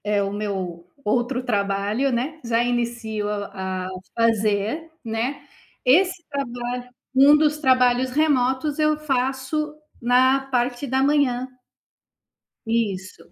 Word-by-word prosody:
É, 205 -1 +2
o 195 - -2
meu 190 -5 -4 0.2
outro 245 +4 0
trabalho, 205 +3 0
né, 265 +7 -2
já 230 0 +1
inicio 235 -3 -2
a 190 -3 -4 0.3
fazer, 225 +7 +1
né, 230 +5 -2 0.4
esse 355 +6 +4
trabalho 245 -3 -4 0.2
um 280 +3 +7
dos 300 0 +2
trabalhos 255 -2 +3
remotos, 285 0 +1
eu 305 0 +3
faço 275 +1 -1 0.3
na 255 +2 +4
parte 245 +1 0
da 265 +1 +1
manhã. 275 -3 +2 1.2
Isso. 205 -7 -2
245 Hz, 110 wpm, -23 LUFS, 215-275 Hz, 1.2 s, um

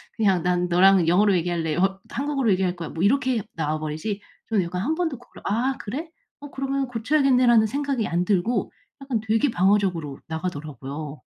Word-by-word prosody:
그냥 195 -5 +2
난 180 0 +1
너랑 180 0 +5
영어로 195 +2 +4
얘기할래. 165 -2 -1
어 195 +1 +1
한국어로 275 -4 -1
얘기할 185 -1 0
거야." 165 - -5
뭐 165 - -3
이렇게 255 +1 +2
나와 155 -1 -1
버리지 155 +7 -4 0.3
저는 205 -5 +2
약간 180 +2 -3
1 315 +7 0
번도 320 -8 -2
그걸 245 - -16
"아 245 +6 0
그래? 285 +11 -5 0.3
어 290 -1 -9
그러면 275 0 -2
고쳐야겠네."라는 250 -2 +3
생각이 275 -1 -1
안 175 +1 0
들고 200 +5 0 0.3
약간 270 -5 -1
되게 225 +5 +2
방어적으로 185 -7 +1
나가더라고요. 150 -3 -6
200 Hz, 390 characters per minute, -24 LUFS, 175-255 Hz, 0.3 s, 너랑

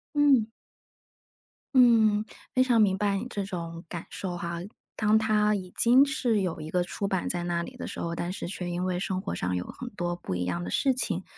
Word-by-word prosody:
嗯。 270 -7 +4 1.2
嗯， 220 -4 +5 0.3
非 255 - +4
常 240 -3 +4
明 195 -2 +3
白 200 0 +1
你 225 +5 -4
这 200 -4 -3
种 170 -3 -6
感 170 0 -6
受 185 -2 -4
哈， 170 0 -4 0.4
当 210 0 +4
它 210 -1 +3
已 185 -2 -6
经 250 +4 +6
是 245 -7 +1
有 180 -4 -2
一 155 0 -6
个 180 +2 +1
初 200 +3 -3
版 190 -2 -1
在 175 -1 -2
那 170 -1 -1
里 - - -9
的 - - -5
时 - - -6
候， 170 - -2
但 175 +1 -3
是 - - -5
却 180 -1 -4
因 175 +1 -2
为 180 -1 -1
生 190 0 -2
活 - - -4
上 90 +1 -1
有 90 - -1
很 250 - -7
多 175 -3 -3
不 95 - -4
一 90 - -1
样 85 -1 -2
的 - - -4
事 265 - +2
情， 205 -8 -2
190 Hz, 235 characters per minute, -28 LUFS, 175-220 Hz, 1.2 s, 经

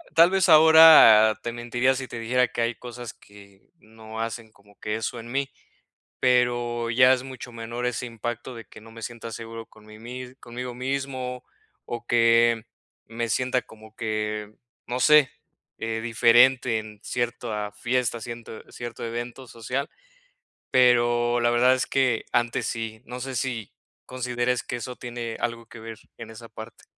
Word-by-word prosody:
tal 170 +2 +6
vez, 190 -1 +2
ahora 155 -9 +8
te 120 - -3
mentiría 120 +2 0
si 130 0 -5
te 120 - -8
dijera 125 +2 +1
que 120 - -4
hay 115 +1 0
cosas 120 0 -9
que 100 -1 -19
no 110 -3 -11
hacen 115 0 -5
como 100 -1 -24
que 105 - -3
eso 115 +2 -4
en 120 +1 -10
mí, 140 0 -2 0.7
pero 120 -2 +1
ya 125 +2 +6
es 125 - -5
mucho 130 -2 -9
menor 115 +1 -5
ese 125 0 -2
impacto 120 +1 -6
de 115 -2 -10
que 110 - -15
no 115 - -14
me 115 0 -12
sienta 115 0 -7
seguro 115 0 -8
con 110 -1 -20
mi 110 0 -13
mis 125 +3 -9
conmigo 125 +1 -7
mismo 130 -1 -4 0.4
o 120 0 -6
que 115 -1 +3 0.4
me 115 0 -3
sienta 125 +2 0
como 110 0 -16
que, 105 -1 -3 0.3
no 125 +1 -3
sé, 150 -1 +6 0.5
eh, 115 0 -3
diferente 120 +1 +4
en 105 -1 -10
cierta 115 -4 -3
fiesta, 120 +1 -1
cierto 115 -1 -8
cierto 120 -1 -8
evento 120 +2 -6
social. 125 +4 -4 0.8
Pero, 120 -1 +3
la 120 0 +2
verdad 125 +2 +4
es 130 - -1
que 130 -4 +1
antes 120 -1 0
sí, 110 -1 -5
no 125 +1 -7
sé, 135 +1 -5
si 120 -3 -3 0.3
consideres 125 -1 -2
que - - -5
eso 125 +1 -6
tiene 120 -2 -6
algo 115 -1 -3
que 115 - -13
ver 110 0 -9 0.2
en 115 -1 -8
esa 115 +1 -11
parte. 110 0 -12
120 Hz, 165 wpm, -25 LUFS, 115-125 Hz, 0.8 s, ahora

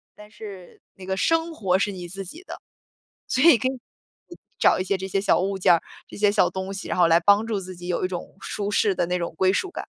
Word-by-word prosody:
但 210 0 -15
是 200 -4 -11 0.2
那 185 - -11
个 190 0 -2
生 330 +4 +1
活 190 - +1
是 205 +1 0
你 180 -2 -7
自 195 +2 -7
己 320 - -11
的。” - - -10 0.7
所 260 - +1
以 330 -8 +8
可 255 - -1
以， 260 -1 -4 0.8
找 - - +4
一 - - 0
些 195 0 0
这 190 - -6
些 195 +1 0
小 200 - +2
物 195 +1 -1
件 180 - +5
儿， 165 - +2 0.3
这 - - -12
些 205 0 +3
小 - - +3
东 190 +1 -5
西， 195 - -6
然 - - -3
后 175 -2 +5
来 165 +1 +5
帮 205 +4 +4
助 215 -3 -2
自 185 0 -8
己 175 +1 -9
有 180 0 -1
一 - - +1
种 185 +1 -7
舒 205 -1 -4
适 205 -1 +2
的 170 - 0
那 180 0 0
种 170 -1 -4
归 190 0 +3
属 375 - -1
感。 - - -6
195 Hz, 285 characters per minute, -24 LUFS, 185-210 Hz, 0.8 s, 以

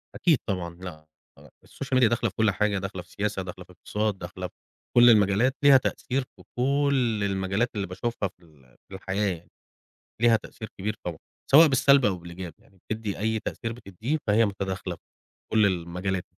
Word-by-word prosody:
أكيد 165 -7 +3
طبعًا، 90 -4 -3
لأ، 85 -4 -9 0.3
آه، - - -16 0.2
الSocial 135 -1 -3
Media 125 -3 +6
داخلة 120 -1 0
في - - -19
كل 110 -2 +3
حاجة، 105 0 0
داخلة 95 -1 -5
في - - -20
سياسة، 105 -1 -2
داخلة 90 0 -8
في - - -18
اقتصاد، 105 +2 -2
داخلة 90 0 -6
في - - -23 0.4
كل 120 0 +9
المجالات، 110 +5 +4
ليها 140 -1 +8
تأثير 130 0 -1
في - - -17
كل 130 -5 +1
المجالات 95 +4 0
اللي 100 -3 -2
باشوفها 100 +2 -3
في 90 - -26
ال 70 -6 -23
في - - -13
الحياة 95 0 -1
يعني، 85 - -21 0.7
ليها 115 -1 +5
تأثير 110 0 -9
كبير 105 +3 -2
طبعًا، 85 -3 -4 0.3
سواء 155 +4 +9
بالسلب 140 0 +5
أو 100 -3 +2
بالإيجاب 85 -1 -8
يعني، 95 - -26
بتدِّي 110 -2 -3
أي 110 +1 0
تأثير 115 +2 -4
بتديه، 115 - -4
فهي 110 +2 +4
متداخلة 95 -2 -4
في - - -35 0.5
كل 110 -2 +5
المجالات. 90 0 -2
100 Hz, 185 wpm, -26 LUFS, 90-120 Hz, 0.7 s, كل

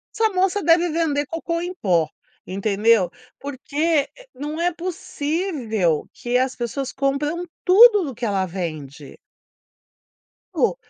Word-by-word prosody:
Essa 445 -1 +3
moça 380 +2 +1
deve 340 +1 +4
vender 305 -3 0
cocô 335 +1 -3
em 355 +1 -4
pó, 175 - +1 0.4
entendeu. 200 0 +2 0.3
Porque, 285 +2 -1
eh, - - -16
não 300 +4 -5
é 350 0 +1
possível 295 - -2
que 240 0 -4
as 260 0 0
pessoas 255 +3 -3
compram 295 +6 -1 0.2
tudo 415 +1 +7
do 270 -5 -6
que 235 - -4
ela 195 -3 0
vende. 155 -6 -7 1.4
Oh, - - +2
285 Hz, 125 wpm, -22 LUFS, 215-340 Hz, 1.4 s, tudo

